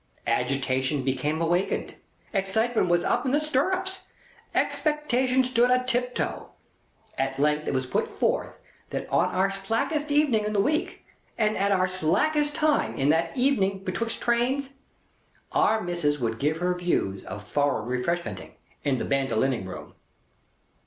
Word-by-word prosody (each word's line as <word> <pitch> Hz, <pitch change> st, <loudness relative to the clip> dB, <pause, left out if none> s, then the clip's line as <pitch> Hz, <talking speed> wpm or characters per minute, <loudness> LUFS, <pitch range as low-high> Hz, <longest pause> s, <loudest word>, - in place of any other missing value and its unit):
Agitation 130 Hz, +1 st, 0 dB
become 150 Hz, +5 st, -1 dB
awakened. 175 Hz, +3 st, 0 dB, 0.4 s
Excitement 220 Hz, +3 st, +1 dB
was 175 Hz, 0 st, +3 dB
up -, -, +1 dB
in 260 Hz, -, 0 dB
the 290 Hz, -, +3 dB
stirrups. 370 Hz, +6 st, -1 dB, 0.5 s
Expectation 260 Hz, -4 st, +1 dB
stood 245 Hz, -1 st, +3 dB
a 250 Hz, 0 st, +3 dB
tiptoe. 250 Hz, 0 st, -2 dB, 0.7 s
At 135 Hz, 0 st, -1 dB
length 150 Hz, +1 st, +1 dB
it -, -, 0 dB
was 130 Hz, 0 st, 0 dB
put 130 Hz, -, -1 dB
forth -, -, -1 dB, 0.3 s
that -, -, -4 dB
on -, -, +4 dB
our 195 Hz, +1 st, +1 dB
slackest 225 Hz, -, -1 dB
evening 285 Hz, -7 st, +3 dB
in 210 Hz, 0 st, -2 dB
the 205 Hz, -, +2 dB
week, 300 Hz, +10 st, 0 dB, 0.3 s
and 215 Hz, -1 st, +2 dB
at 200 Hz, +1 st, +1 dB
our 185 Hz, -1 st, +3 dB
slackest 290 Hz, -, +1 dB
time 310 Hz, -2 st, +1 dB
of 135 Hz, +2 st, +2 dB
that 165 Hz, -, +1 dB
evening 195 Hz, -8 st, +2 dB
betwixt 225 Hz, +4 st, -3 dB
trains, 260 Hz, +3 st, +1 dB, 0.8 s
Our 220 Hz, 0 st, +3 dB
Missis 170 Hz, -5 st, 0 dB
would 115 Hz, -4 st, -2 dB
give 150 Hz, +3 st, +1 dB
her 180 Hz, +2 st, 0 dB
views 175 Hz, -, -1 dB
of 105 Hz, -, -7 dB
foreign 145 Hz, -6 st, 0 dB
Refreshmenting, 150 Hz, +8 st, -3 dB, 0.3 s
in 140 Hz, -3 st, +1 dB
the -, -, -2 dB
Bandolining 135 Hz, -5 st, 0 dB
Room. 95 Hz, -, -9 dB
190 Hz, 145 wpm, -26 LUFS, -, 0.8 s, on